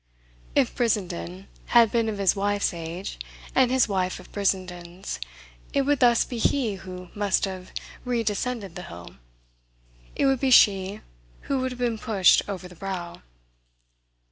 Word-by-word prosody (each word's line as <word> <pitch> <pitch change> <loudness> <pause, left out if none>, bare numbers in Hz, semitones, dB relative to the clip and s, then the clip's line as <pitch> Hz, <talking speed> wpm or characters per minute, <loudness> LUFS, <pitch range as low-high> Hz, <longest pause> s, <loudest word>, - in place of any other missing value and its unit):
If - - +3
Brissenden 190 -5 -1 0.3
had 230 -2 +7
been 230 -2 +1
of 210 - -3
his 195 -1 +3
wife's 205 0 0
age 170 +3 -6 0.3
and 260 -2 +4
his 260 -1 +3
wife 185 -3 -1
of - - -14
Brissenden's, 185 - -2 0.5
it 275 - +3
would 285 0 +2
thus 240 -2 +5
be 240 - -5
he 235 -2 +1
who 180 -1 -9
must 205 -1 +1
have 185 -1 -7 0.3
redescended 230 -3 -2
the 180 - -7
hill, 85 -2 -11 1.0
it - - +1
would 270 -2 +3
be 270 - +1
she 200 -4 +5 0.4
who 275 - -1
would 260 0 -1
have - - -10
been 240 -3 -1
pushed 200 -4 +4
over 185 -2 -5
the 180 - -14
brow. 180 -1 -6
200 Hz, 150 wpm, -25 LUFS, 185-235 Hz, 1.0 s, had